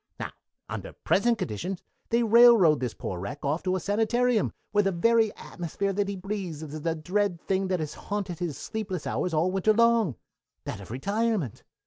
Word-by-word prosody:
"Now, - - -4 0.4
under - - -6
present 235 +3 +2
conditions 175 - -4 0.3
they 235 +1 +3
railroad 225 - +7
this 125 -2 -3
poor 90 - -5
wreck 100 - -6
off 150 +4 0
to 185 0 0
a - - 0
sanitarium, 225 +4 +1 0.2
where 205 - +4
the 195 - +1
very 220 +4 +3
atmosphere 195 +3 -3
that 200 +1 0
he 200 - -3
breathes 185 -5 -5
is 155 0 -7
the 165 +1 0
dread 180 +3 0
thing 190 +2 -1
that 185 -1 0
has 150 -1 -3
haunted 200 -5 -4
his 165 -6 -3
sleepless 195 -6 -4
hours 180 - -1
all 165 +3 +2
winter 195 +3 +3
long 230 - +3 0.5
that 100 - -5
of 95 - -11
retirement. 200 - -1
190 Hz, 180 wpm, -27 LUFS, 160-215 Hz, 0.5 s, railroad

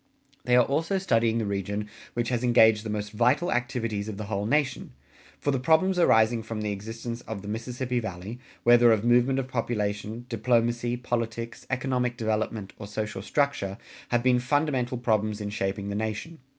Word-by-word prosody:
They 125 +1 +4
are 125 -1 +6
also 165 +8 0
studying 115 -11 +2
the 115 - 0
region 100 +1 -2 0.3
which 120 -1 0
has 125 -1 -1
engaged 110 -3 +5
the 110 - -5
most 105 -1 -3
vital 125 +11 +2
activities 115 -4 -1
of 105 - -6
the 105 - -4
whole 100 0 -2
nation; 135 - 0 0.5
for 145 - 0
the 135 - 0
problems 165 +7 +3
arising 115 -7 +4
from 110 -1 -5
the 105 -1 -1
existence 115 +4 -6
of 105 -3 -5
the - - -8
Mississippi 125 +3 -2
Valley, 105 +2 -6 0.2
whether 120 0 +6
of 110 0 +2
movement 125 +2 +4
of 135 -1 -1
population, 110 -2 -2
diplomacy, 120 0 +1
politics, 115 -2 -4
economic 125 -2 -1
development, 110 -2 -2
or 105 - -7
social 105 -1 -4
structure, 105 -5 -1 0.3
have 120 -1 +1
been 125 -1 +4
fundamental 130 -1 0
problems 110 -3 0
in 105 -1 -4
shaping 100 0 -2
the 100 - -3
nation. 110 +9 -4
115 Hz, 175 wpm, -27 LUFS, 105-125 Hz, 0.5 s, are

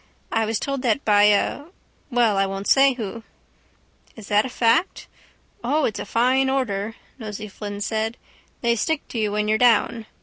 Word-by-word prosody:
I 225 0 +1
was 225 -1 -1
told 275 -2 -3
that 250 +1 0
by 205 -1 +5
a—well, 240 - 0
I 195 0 +2
won't 195 +1 -5
say 270 +3 +5
who. 230 -2 -6 0.9
—Is 220 -3 -12
that 210 +3 +3
a - - -8
fact? 240 +9 +1 0.6
—O, 290 +5 +1
it's 215 - -2
a - - -6
fine 255 +5 +2
order, 225 -5 -2 0.2
Nosey 215 -1 -6
Flynn 205 0 -7
said. 220 +2 -2 0.4
They 235 -1 +2
stick 310 +7 -2
to 235 - -4
you 210 -1 0
when 210 0 -1
you're 215 0 +2
down. 230 -2 +2
225 Hz, 170 wpm, -22 LUFS, 210-250 Hz, 0.9 s, by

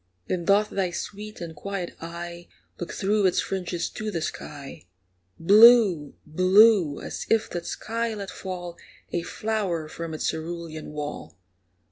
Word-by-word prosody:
Then 175 - -2
doth 205 +3 +3
thy 190 -2 0
sweet 210 +4 -7
and 165 -2 -6
quiet 195 +1 -5
eye 170 +1 -7 0.3
Look 175 - -5
through 205 0 +2
its 180 - +1
fringes 180 -2 -2
to 215 0 -4
the 170 -6 -2
sky, 140 - -7 0.5
Blue 205 -5 +6
blue 185 0 +5
as - - -6
if 225 -1 +3
that 175 - -4
sky 230 0 -3
let 200 -2 -6
fall 175 -2 -6 0.4
A 175 - 0
flower 195 -5 -2
from 165 0 -6
its - - -2
cerulean 160 -1 -5
wall. 145 - -6
175 Hz, 140 wpm, -26 LUFS, 165-205 Hz, 0.5 s, Blue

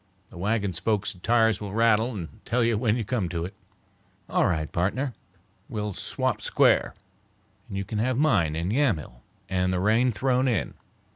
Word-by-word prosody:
The - - -12
wagon 100 0 0
spokes 105 +3 -1
and 90 - -18
tires 115 -2 +3
will 100 -1 -5
rattle 115 +1 +3
and 95 +3 -8
tell 125 0 +1
you 115 -1 +2
when 110 0 +1
you 115 - -2
come 105 -6 -1
to 85 -1 -3
it." 95 - -7 0.7
"All - - +2
right, 80 -4 -1
partner, 125 +10 -1 0.6
we'll 105 -1 -3
swap - - -1
square, - - +3 0.7
you 100 -1 -3
can 105 +2 -3
have 125 +2 +1
mine 105 - +2
in 85 +4 -2
Yamhill 100 - 0 0.3
and 90 -1 0
the 90 - 0
rain 110 +6 +3
thrown 130 +4 +1
in. 115 -6 0
105 Hz, 170 wpm, -26 LUFS, 90-115 Hz, 0.7 s, tires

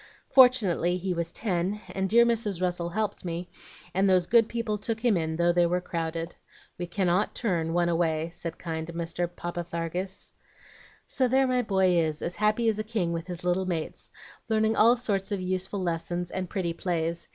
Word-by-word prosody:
Fortunately 210 -9 +5
he 185 0 -2
was 170 -1 -3
ten, 190 0 -1
and 190 0 -1
dear 235 +3 +6
Mrs. 220 -6 0
Russell 175 -1 -1
helped 210 +2 -2
me, 175 0 -4 0.5
and 195 +1 +3
those 185 -2 +4
good 230 +3 +4
people 230 -3 -2
took 225 +1 -2
him 230 -4 +4
in 160 -2 -1
though 170 +1 +3
they 175 0 +4
were 180 +1 +1
crowded. 165 -1 -4 0.5
'We 175 - -3
cannot 185 +2 0
turn 170 -8 0
one 175 +1 +2
away,' 165 -1 0
said 170 -1 -6
kind 160 -2 -4
Mr. 170 +1 -3
Parpatharges. 175 +2 -4 0.7
"So 260 - +1
there 265 +2 +3
my 255 -1 +2
boy 190 -5 +2
is, 155 -2 -1
as 175 - -3
happy 215 +2 +2
as 215 -1 +1
a - - -1
king 210 -6 -1
with 165 +1 -4
his 180 -1 -6
little 180 +1 +1
mates, 165 -3 -4 0.4
learning 220 0 +2
all 235 +3 +5
sorts 205 -4 -2
of 200 - -1
useful 185 +1 -2
lessons 175 +1 -2
and 185 -2 -3
pretty 180 -5 -2
plays. 170 -1 -2
180 Hz, 185 wpm, -27 LUFS, 170-210 Hz, 0.7 s, dear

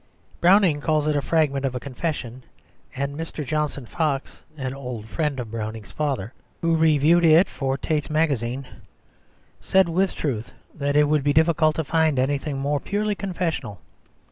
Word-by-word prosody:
Browning 180 -4 +4
calls 155 -1 +1
it 150 -1 +1
a 145 - +1
fragment 145 -3 +1
of 130 -2 -1
a - - -2
confession; 130 -2 -5 0.5
and 140 +1 -3
Mr. 160 -1 -5
Johnson 150 -2 -2
Fox, 145 0 -2 0.2
an 130 -2 -3
old 125 -5 -6
friend 150 +1 -2
of 115 -3 -6
Browning's 110 -3 -5
father, 135 -8 -2 0.3
who 165 -1 +2
reviewed 160 +1 +4
it 165 +3 +6
for 135 -1 -2
Tait's 150 +1 -2
Magazine, 140 -5 0 0.9
said, 190 -1 +3
with 185 +3 0
truth, 125 -4 -3 0.2
that 145 -1 -2
it 150 - +6
would 150 -1 +2
be 145 0 +2
difficult 160 0 +3
to 160 - -1
find 160 -1 +1
anything 140 +2 0
more 140 +1 0
purely 210 +4 -1
confessional. 175 - -3
145 Hz, 160 wpm, -24 LUFS, 135-160 Hz, 0.9 s, it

